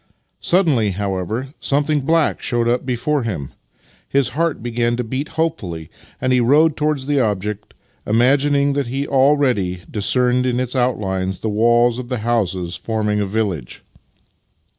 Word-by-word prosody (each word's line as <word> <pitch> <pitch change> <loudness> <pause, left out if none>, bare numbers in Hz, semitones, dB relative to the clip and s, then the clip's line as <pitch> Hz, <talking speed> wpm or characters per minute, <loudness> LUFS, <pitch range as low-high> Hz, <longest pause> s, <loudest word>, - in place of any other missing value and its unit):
Suddenly, 155 - +2
however, 100 +6 -3
something 145 +1 +1
black 160 +3 +1
showed 120 -2 0
up 125 +2 0
before 130 +4 0
him. 90 - -4 0.6
His 140 -2 +2
heart 165 -4 -1
began 120 0 0
to 125 - -1
beat 130 +6 -4
hopefully, 95 - -3 0.3
and 130 0 +1
he 125 - +4
rode 145 +6 +4
towards 150 -3 -1
the 145 0 +1
object, 105 -2 -2 0.3
imagining 140 +5 +3
that 140 -2 -1
he 135 +4 -3
already 130 -10 +2
dis 105 -2 -2
cerned 125 0 +2
in 125 -1 0
its 125 +1 -3
outlines 95 -7 -1
the 110 - -1
walls 120 +3 +3
of 125 -1 -7
the 125 - -1
houses 95 -7 -1
forming 105 -2 -1
a 100 - -1
village. 95 - -3
120 Hz, 150 wpm, -19 LUFS, 105-140 Hz, 0.6 s, he